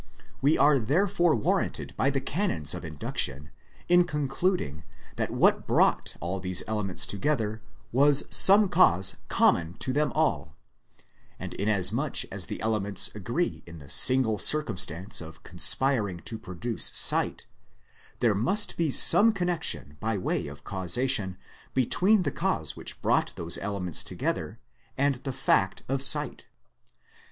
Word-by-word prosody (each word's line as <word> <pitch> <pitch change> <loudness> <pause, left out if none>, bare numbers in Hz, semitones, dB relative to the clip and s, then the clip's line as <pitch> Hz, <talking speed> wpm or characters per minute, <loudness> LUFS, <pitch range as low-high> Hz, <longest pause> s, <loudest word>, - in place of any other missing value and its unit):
We 145 +4 +2
are 145 -1 +3
therefore 175 - 0
warranted 110 - -3
by 135 - 0
the 135 -1 -2
canons 135 - -2
of 90 - -8
induction 75 -2 -5 0.4
in 175 0 +3
concluding 150 - -3 0.3
that - - -3
what - - 0
brought - - 0
all 90 +3 -5
these 90 -1 -1
elements 105 -4 -1
together 110 -1 -3 0.3
was 140 +3 +3
some 200 +2 +7
cause 95 - +2
common 85 +1 0
to 130 - -4
them 150 -1 -1
all; - - -2 0.8
and - - -8
inasmuch 100 -2 0
as - - -4
the - - -7
elements 105 -3 0
agree 120 - -4
in 85 0 -12
the 70 -3 -9
single 125 -4 +6
circumstance 95 - +1
of 80 -1 -13
conspiring 110 -10 +1
to 110 - -7
produce 100 +5 -2
sight, - - +2 0.8
there 115 -3 +2
must 160 - +1
be 165 -2 -1
some 220 - +7
connection 175 - -3
by 110 -1 -3
way 90 - -3
of 70 0 -12
causation 95 0 -1 0.4
between 185 - +2
the - - -3
cause - - -3
which - - -7
brought - - 0
those 85 0 -3
elements 95 -5 -3
together, - - -5 0.4
and 140 -1 0
the 135 - -4
fact 95 -5 -1
of 135 +1 -3
sight. 135 0 0
115 Hz, 135 wpm, -26 LUFS, 95-150 Hz, 0.8 s, some